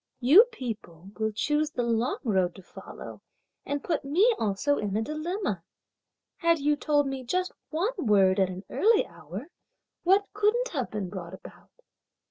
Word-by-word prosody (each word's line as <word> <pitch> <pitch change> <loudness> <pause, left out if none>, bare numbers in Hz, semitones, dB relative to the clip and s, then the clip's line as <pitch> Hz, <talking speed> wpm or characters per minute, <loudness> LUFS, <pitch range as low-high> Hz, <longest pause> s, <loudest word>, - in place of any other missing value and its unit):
"You 300 - +8
people 215 - -8
will 220 0 0
choose 295 +7 0
the 250 -5 -2
long 235 +1 0
road 190 -7 +1
to 190 - -13
follow - - -10 0.5
and 285 0 -2
put 345 - -1
me 365 - +3
also 225 +7 +1
in 205 -1 -1
a - - +1
dilemma! 310 - -3 0.8
Had 335 -2 +3
you 295 0 +2
told 290 0 +1
me 270 -1 -4
just 365 +9 -1 0.2
one 360 +10 -1
word 195 -2 +4
at 190 -1 +3
an 185 +1 -7
early 445 +1 +3
hour, 170 - -9 0.5
what 390 +3 +4
couldn't 425 +4 +1
have 265 -7 -3
been 210 -3 -4
brought 185 -2 -7
about? - - -15
270 Hz, 160 wpm, -27 LUFS, 200-335 Hz, 0.8 s, You